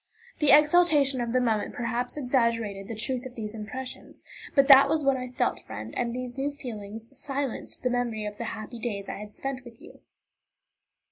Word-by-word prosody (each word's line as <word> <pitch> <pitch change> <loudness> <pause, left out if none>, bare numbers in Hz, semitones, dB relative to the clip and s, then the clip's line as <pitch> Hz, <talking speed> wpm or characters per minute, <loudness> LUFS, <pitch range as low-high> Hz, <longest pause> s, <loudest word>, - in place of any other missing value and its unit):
The 300 - +3
exaltation 295 -3 +5
of 235 -1 -2
the 255 - +3
moment 225 -4 0
perhaps 245 +2 -2
exaggerated 230 -7 0
the 230 - -5
truth 250 +3 -2
of 250 - -14
these 215 -2 -5
impressions, 240 +4 -7 0.3
but 275 -2 +5
that 275 0 +9
was 310 -1 +1
what 275 -1 +3
I 255 -1 -4
felt, 250 - 0
friend, 110 +1 -8
and 240 -1 0
these 250 +1 -5
new 280 +2 0
feelings 225 -3 -8
silenced 275 -1 -3
the 250 - +1
memory 235 -3 -1
of 210 0 -6
the 235 - -3
happy 225 +2 -6
days 205 -4 -3
I - - -5
had 210 0 -8
spent 265 +3 -5
with 235 -2 -13
you. - - -14
245 Hz, 190 wpm, -27 LUFS, 220-270 Hz, 0.3 s, that